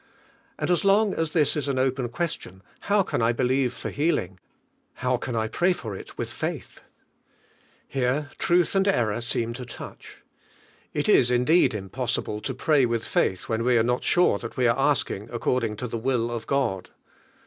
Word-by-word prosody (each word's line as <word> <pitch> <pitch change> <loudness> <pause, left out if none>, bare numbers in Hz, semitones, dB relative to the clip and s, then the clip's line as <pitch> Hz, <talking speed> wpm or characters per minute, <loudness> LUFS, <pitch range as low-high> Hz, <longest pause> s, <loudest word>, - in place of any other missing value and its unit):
And - - -1
as 175 - +2
long 200 +1 +4
:is 165 -1 -1
liiis 150 -3 +2
is 150 -2 -2
an 135 -2 -1
open 130 -1 0
question, 115 - -5 0.3
how 205 -1 +4
can - - -2
l 115 +1 +3
believe 125 +1 +1
for 115 - -6
healing, 110 - -1 0.6
how 125 0 0
can 120 0 -4
l 110 -1 0
pray 175 +11 +2
far 115 - -6
it - - -10
Willi - - -3
faithf - - -5 1.1
Here 135 +3 -1
Irulb 175 0 +2
and 195 0 +2
error 115 - +1
seem 115 0 -1
to 125 +1 -7
touch. 125 - -11 0.7
It - - -1
is 120 - +5
indeed 125 +3 +3
impossible 105 +1 -3
to 130 - -3
pray 140 -1 +3
with 115 -1 -2
faith 95 - 0
when 115 0 -1
we 125 0 +3
are 110 - +4
not 125 +1 0
sure 175 -12 +3
that 115 - -8
we 125 - +2
are 115 +2 +2
asking 135 -6 0
according 120 -2 0
to 125 - -5
the 115 0 -4
will 120 -1 0
of 120 -2 -5
God. 125 -10 -1
125 Hz, 180 wpm, -25 LUFS, 115-145 Hz, 1.1 s, is